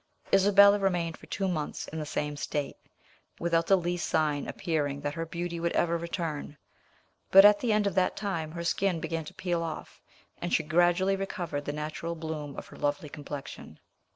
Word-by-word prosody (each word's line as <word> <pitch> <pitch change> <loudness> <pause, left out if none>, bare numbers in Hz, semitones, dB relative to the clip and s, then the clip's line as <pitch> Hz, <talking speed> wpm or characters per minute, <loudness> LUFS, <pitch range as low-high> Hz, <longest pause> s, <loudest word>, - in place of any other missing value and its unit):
Isabella 200 +1 +7
remained 175 -4 0
for - - -16
two 195 - -2
months 155 -5 -3
in 160 - -5
the 150 - -4
same 150 -1 -2
state, 145 0 -3 0.6
without 170 -1 +1
the 195 - +6
least 175 0 -2
sign 150 -2 +1
appearing 145 -5 -2
that 145 0 -2
her 165 +1 -4
beauty 170 0 -4
would 170 0 -1
ever 170 0 +2
return; 165 -3 -4 0.7
but 195 +1 +9
at 205 0 +7
the 240 - 0
end 210 -1 +3
of 200 - 0
that 185 -1 +2
time 165 -6 -3
her 170 0 -4
skin 180 0 +1
began 165 -1 -3
to - - -10
peel 175 -2 -1
off, 165 -2 -6 0.4
and 175 - -3
she - - +1
gradually 175 +4 +3
recovered 175 -7 -4
the - - -2
natural 155 +3 -4
bloom 155 -3 -5
of - - -6
her - - -12
lovely 145 +1 -1
complexion. 145 -1 -8
170 Hz, 185 wpm, -29 LUFS, 150-185 Hz, 0.7 s, but